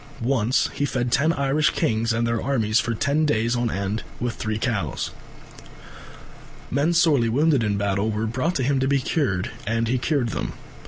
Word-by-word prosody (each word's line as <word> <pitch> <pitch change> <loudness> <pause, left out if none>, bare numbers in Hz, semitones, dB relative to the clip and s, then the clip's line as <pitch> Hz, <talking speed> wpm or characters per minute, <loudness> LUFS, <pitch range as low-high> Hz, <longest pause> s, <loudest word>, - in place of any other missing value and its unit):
Once 125 -1 +2
he - - -2
fed 125 -3 -1
ten 155 +6 +3
Irish 140 0 +2
kings 115 +1 0
and 115 +1 0
their 115 -1 0
armies 115 -5 +1
for 120 -2 -1
ten 140 +7 +1
days 120 -5 +1
on 120 -1 0
end 100 +2 -2 0.2
with 120 -1 -2
three 110 0 -3
cows. 110 - -2 1.6
Men 145 +6 +2
sorely 150 -8 +3
wounded 140 +1 +2
in 105 -2 0
battle 100 +1 0
were 110 +1 -1
brought 130 +10 -1
to 130 - 0
him 135 +1 +1
to 135 - +1
be 140 0 +3
cured, 130 - -1 0.2
and 115 +1 0
he 125 +2 +1
cured 130 -2 0
them. - - -3
120 Hz, 180 wpm, -23 LUFS, 110-140 Hz, 1.6 s, ten